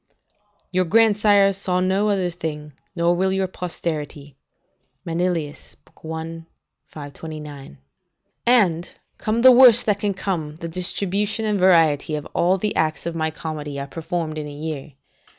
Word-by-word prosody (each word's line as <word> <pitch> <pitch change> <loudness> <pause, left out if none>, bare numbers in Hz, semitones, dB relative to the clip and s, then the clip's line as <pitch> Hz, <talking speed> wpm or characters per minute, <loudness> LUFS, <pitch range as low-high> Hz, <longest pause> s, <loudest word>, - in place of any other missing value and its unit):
["Your 185 0 +1
grandsires 205 -1 +4
saw 185 -2 -1
no 190 +3 +1
other 190 -3 0
thing; 150 -3 -6 0.2
nor 170 0 +2
will 190 +2 +1
your 190 0 0
posterity." 155 -6 -5 0.7
Manilius, 170 -3 -3
i. 160 +1 -7 0.5
529.] 145 - -9 0.7
"And, 185 -9 +2 0.2
come 225 +2 -1
the 260 - +10
worst 245 -2 +7
that 205 -2 +1
can 205 -2 -1
come, 165 -6 -3
the 165 +1 -7
distribution 200 +5 -1
and 210 -2 0
variety 165 -5 +3
of 150 - -5
all 180 +3 +2
the 210 +2 -2
acts 155 -1 -1
of 170 - -3
my 160 -1 -1
comedy 150 -3 -6
are 140 - -4
performed 165 +1 -4
in 150 - -5
a - - -8
year. 150 -1 -6
170 Hz, 140 wpm, -22 LUFS, 155-195 Hz, 0.7 s, the